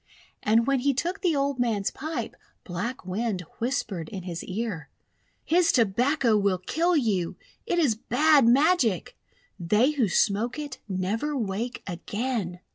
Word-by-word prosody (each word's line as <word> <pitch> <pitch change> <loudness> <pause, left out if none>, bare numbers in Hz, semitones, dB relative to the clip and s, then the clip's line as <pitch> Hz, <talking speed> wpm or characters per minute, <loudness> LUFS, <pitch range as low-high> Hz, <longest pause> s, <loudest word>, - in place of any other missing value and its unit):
And 225 +2 +3
when 275 0 +2
he 275 +1 +1
took 350 +9 -2
the 350 -5 +2
old 280 -1 0
man's 220 -5 0
pipe, 290 -5 -5 0.3
Black 205 +6 -5
Wind 195 +1 -2 0.2
whispered 225 - -2
in 190 -3 -6
his 175 -2 -5
ear: 190 -7 -4 0.3
— - - -42
'His 345 +1 +3
Tobacco 240 +2 +2
will 200 -2 +2
kill 330 - +1
you! 200 - 0 0.3
It 350 - 0
is 300 -9 +3
bad 275 +4 +3
magic! 255 - +3 0.4
They 210 - +3
who 260 -9 +1
smoke 215 - +1
it 290 -3 -6
never 210 +11 -1
wake 225 +2 -3
again!' 200 0 -3
230 Hz, 145 wpm, -26 LUFS, 195-280 Hz, 0.4 s, And